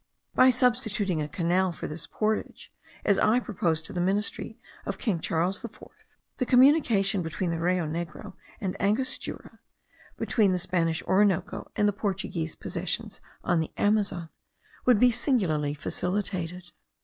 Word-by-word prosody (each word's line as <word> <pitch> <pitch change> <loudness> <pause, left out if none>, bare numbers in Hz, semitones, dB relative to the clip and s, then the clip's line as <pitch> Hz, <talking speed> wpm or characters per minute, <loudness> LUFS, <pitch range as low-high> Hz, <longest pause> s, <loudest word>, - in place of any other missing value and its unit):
By 255 - +6
substituting 220 -8 +1
a 150 - -2
canal 175 +4 +1
for 170 - -7
this 155 +1 -7
portage, 215 0 -2 0.3
as 200 - +3
I 230 +3 +4
proposed 170 -9 -1
to - - -7
the 175 - -1
ministry 195 +4 0 0.3
of - - -4
king 200 -9 -1
Charles 170 +6 -1
IV, 235 - -8 0.6
the 255 - 0
communication 245 - +4
between 170 +2 -2
the 165 - -2
Rio 175 0 +1
Negro 160 0 -5 0.3
and 190 -5 -2
Angostura, 215 +7 -1 0.6
between 205 -5 +2
the - - +1
Spanish 170 -2 0
Orinoco 195 -1 +1
and 210 - +3
the 205 - +2
Portuguese 190 -5 -3
possessions - - -4 0.2
on 175 - +2
the 160 - -1
Amazon, 200 -5 +1 0.6
would 245 -5 +6
be 250 +1 +6
singularly 180 - 0
facilitated. 180 +2 -3
190 Hz, 140 wpm, -27 LUFS, 170-215 Hz, 0.6 s, By